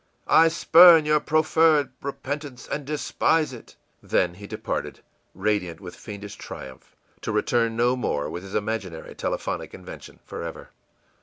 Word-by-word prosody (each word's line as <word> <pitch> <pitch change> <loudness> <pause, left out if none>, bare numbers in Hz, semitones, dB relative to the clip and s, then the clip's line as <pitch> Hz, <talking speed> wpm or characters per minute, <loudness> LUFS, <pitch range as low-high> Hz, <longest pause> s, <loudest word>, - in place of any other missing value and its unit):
I 165 - +6
spurn 165 0 +7
your 150 0 +3
proffered 155 -1 +3
repentance, 140 -1 -6
and 145 - -4
despise 150 0 0
it!î 120 - -12 0.3
Then 90 -1 +2
he 100 +3 -11
departed, - - -4 0.3
radiant 95 -4 -1
with 90 -3 -10
fiendish 105 -1 -9
triumph, 65 -1 -10 0.3
to - - -3
return 115 +2 +1
no 120 +2 +3
more 75 - -2
with 85 +3 -6
his 95 +1 -9
imaginary 100 -6 -3
telephonic - - -4
invention - - -11
forever. - - -7
120 Hz, 135 wpm, -24 LUFS, 100-150 Hz, 0.3 s, spurn